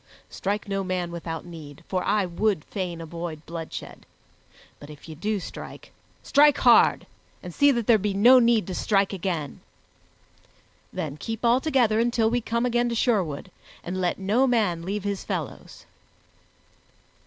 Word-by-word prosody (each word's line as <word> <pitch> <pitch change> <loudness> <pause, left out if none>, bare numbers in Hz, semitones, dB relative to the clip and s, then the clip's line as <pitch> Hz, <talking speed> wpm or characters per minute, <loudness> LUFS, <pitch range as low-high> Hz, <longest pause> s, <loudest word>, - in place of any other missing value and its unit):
Strike 205 +2 -3
no 195 -1 -2
man 180 -2 -2
without 165 -1 -6
need, 155 -5 -11
for 185 -1 -1
I 205 -1 +1
would 180 -1 0
fain 180 -4 -5
avoid 165 -1 -7
bloodshed, 165 -1 -8 0.7
but 145 - -12
if 150 +1 -12
ye 160 - -8
do 205 +6 -2
strike, - - -9 0.3
strike 295 -1 +5
hard, 240 -2 +5 0.4
and 180 -2 -8
see 285 - +4
that 235 -4 -1
there 225 -1 +5
be 200 0 -2
no 245 +6 +7
need 235 -3 +3
to 190 - -5
strike 195 +1 +1
again. 170 -6 -3 1.3
Then 150 -2 -5
keep 225 +6 -5
all 240 +2 +4
together 245 -8 +2
until 230 -1 +2
we 245 0 +1
come 235 +2 -1
again 240 0 +1
to 235 - -2
Sherwood, 185 - 0 0.3
and 185 +2 -4
let 175 -1 0
no 215 +8 +2
man 210 -9 +1
leave 195 +3 -4
his 200 -1 -3
fellows." - - -6
200 Hz, 155 wpm, -25 LUFS, 170-235 Hz, 1.3 s, no